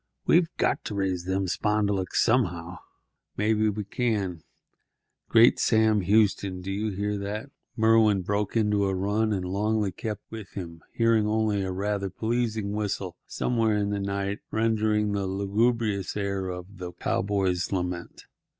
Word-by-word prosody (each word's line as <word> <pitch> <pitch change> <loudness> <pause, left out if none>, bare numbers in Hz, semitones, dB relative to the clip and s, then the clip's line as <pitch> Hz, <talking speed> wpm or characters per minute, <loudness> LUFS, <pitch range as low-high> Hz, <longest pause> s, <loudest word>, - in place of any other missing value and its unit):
We've 170 0 +4
got - - +1
to 105 - -4
raise 95 -3 -1
them 95 +1 0
spondulicks 100 0 0
somehow. 90 -7 0 0.6
Maybe 110 0 +2
we 105 0 -3
can—Great 105 +2 0
Sam 110 -2 +3
Houston! 100 -1 +2
do 95 +2 -5
you 105 +3 -1
hear 100 +1 -2
that?" 105 +7 -5 0.3
Merwin 110 -3 +4
broke 105 +3 -1
into 105 -2 +2
a 95 - 0
run, 105 +4 0
and 95 -3 -1
Longley 105 +2 0
kept 105 +1 -5
with 110 -3 -8
him, 85 -4 -7
hearing 115 -2 +2
only 110 -2 +1
a 95 -1 -2
rather 100 +1 -2
pleasing 110 0 -1
whistle 100 -4 -3
somewhere 115 -3 +1
in 100 0 0
the 100 - -1
night 100 +1 -2
rendering 110 -1 +1
the 100 -1 -1
lugubrious 100 +1 0
air 100 -2 -2
of 90 +2 -8
"The 90 -1 -6
Cowboy's 95 -3 0
Lament." 90 -2 -4
100 Hz, 140 wpm, -27 LUFS, 95-110 Hz, 0.6 s, We've